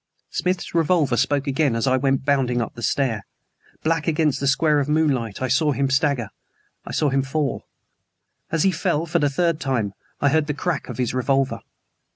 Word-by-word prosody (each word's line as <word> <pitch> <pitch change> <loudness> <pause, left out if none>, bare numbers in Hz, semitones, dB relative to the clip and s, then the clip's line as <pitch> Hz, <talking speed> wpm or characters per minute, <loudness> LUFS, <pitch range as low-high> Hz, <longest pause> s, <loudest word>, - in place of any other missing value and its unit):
Smith's 180 0 -2
revolver 165 -5 +2
spoke 135 +4 +1
again 140 -2 +1
as 115 - 0
I 130 -1 +3
went 135 0 +1
bounding 135 -4 +2
up 115 - -3
the 120 - -10
stair. 115 -4 0 0.6
Black 165 0 0
against 155 -3 +1
the 140 - -1
square 150 +2 +3
of 145 0 -1
moonlight 135 -8 0
I - - +1
saw 145 +4 +2
him 135 0 0
stagger, 130 -5 +1 0.6
I - - -5
saw 150 - +1
him 135 0 +2
fall. 135 0 -2 0.8
As 165 -1 +1
he 195 - +4
fell, 170 -2 0
for 170 +1 0
the 145 -2 +2
third 165 +2 0
time, 115 -7 -1 0.3
I 140 - +3
heard 155 +1 +2
the 150 - -2
crack 165 -1 -2
of - - -6
his 125 -2 -1
revolver. 135 +1 +1
140 Hz, 190 wpm, -22 LUFS, 130-155 Hz, 0.8 s, he